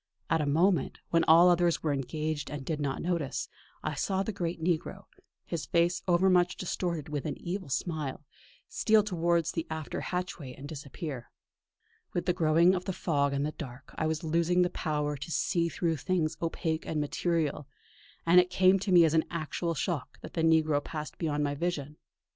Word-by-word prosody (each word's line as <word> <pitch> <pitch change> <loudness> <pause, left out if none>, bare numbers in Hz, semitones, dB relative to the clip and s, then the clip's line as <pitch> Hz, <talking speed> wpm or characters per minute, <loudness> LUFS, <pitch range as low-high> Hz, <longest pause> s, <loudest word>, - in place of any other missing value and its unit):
At 165 -1 +3
a 150 - -1
moment, 165 +2 +2
when 165 -1 +4
all 165 +3 +7
others 175 -1 +2
were 150 -2 +1
engaged 150 +2 -3
and 145 -3 -6
did 155 0 -2
not 140 -1 -2
notice 170 -5 -1 0.4
him, - - -1
I - - -5
saw 190 -1 0
the 220 - -3
great 175 -4 -3
negro, 165 0 -2 0.4
his 165 -3 -4
face 170 +1 +2
over 180 +1 +4
much 180 -1 +3
distorted 170 -4 -3
with 150 0 -3
an 150 - -4
evil 185 -1 -5
smile, 150 -1 -3 0.4
steal 215 -1 +3
towards 170 -4 +1
the 165 - -3
after 160 -1 -4
hatchway 180 -7 -4
and 140 - -9
disappear. 140 -3 -7 0.8
With 175 - -1
the 180 - +2
growing 165 +2 +4
of 180 -1 -2
the 190 - -2
fog 140 -5 0
and 140 +1 0
the 150 - -2
dark, 130 -3 -9
I 160 - 0
was 160 0 -2
losing 170 +3 +2
the 180 - 0
power 150 -3 -2
to 140 - -7
see 170 +1 +1
through 165 -1 -1
things 165 -1 0
opaque 165 -1 -2
and 155 - -1
material; 150 -1 -1 0.6
and 170 +2 +7
it 180 0 +3
came 185 +1 +4
to 195 +1 -2
me 175 -2 +8
as 160 - +1
an 160 -1 +3
actual 170 +1 -2
shock 155 -2 -3
that - - -9
the 165 - -1
negro 155 -3 +3
passed 155 -1 -6
beyond 150 -2 0
my 145 -1 0
vision. 150 -2 -3
165 Hz, 190 wpm, -30 LUFS, 150-175 Hz, 0.8 s, me